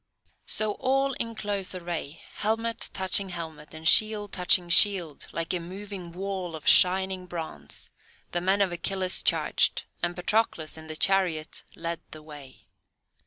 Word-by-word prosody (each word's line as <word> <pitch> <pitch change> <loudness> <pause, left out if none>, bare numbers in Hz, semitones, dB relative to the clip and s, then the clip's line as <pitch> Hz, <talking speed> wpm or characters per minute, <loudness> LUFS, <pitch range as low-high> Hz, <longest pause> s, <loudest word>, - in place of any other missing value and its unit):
So 215 -1 +1
all 270 +1 +1
in 230 -2 -2
close 200 -3 -2
array, 170 -4 -5
helmet 225 +2 -1
touching 190 +1 +1
helmet 160 -3 -8
and 160 0 -4
shield 215 +2 +4
touching 180 -1 +3
shield, 170 -5 +4
like 165 +2 -3
a 180 - -1
moving 185 0 -8
wall 185 -1 -5
of 155 - -9
shining 185 0 +5
bronze, 160 - -7 0.4
the 175 - -1
men 190 +3 +2
of 195 -3 +2
Achilles 185 +1 -2
charged, - - +1 0.2
and 175 0 0
Patroclus, 180 -4 0
in 160 0 -11
the 155 - -6
chariot 175 -3 +1
led 170 -1 -4
the 155 +1 -11
way. 145 -4 -12
180 Hz, 145 wpm, -27 LUFS, 165-200 Hz, 0.4 s, shining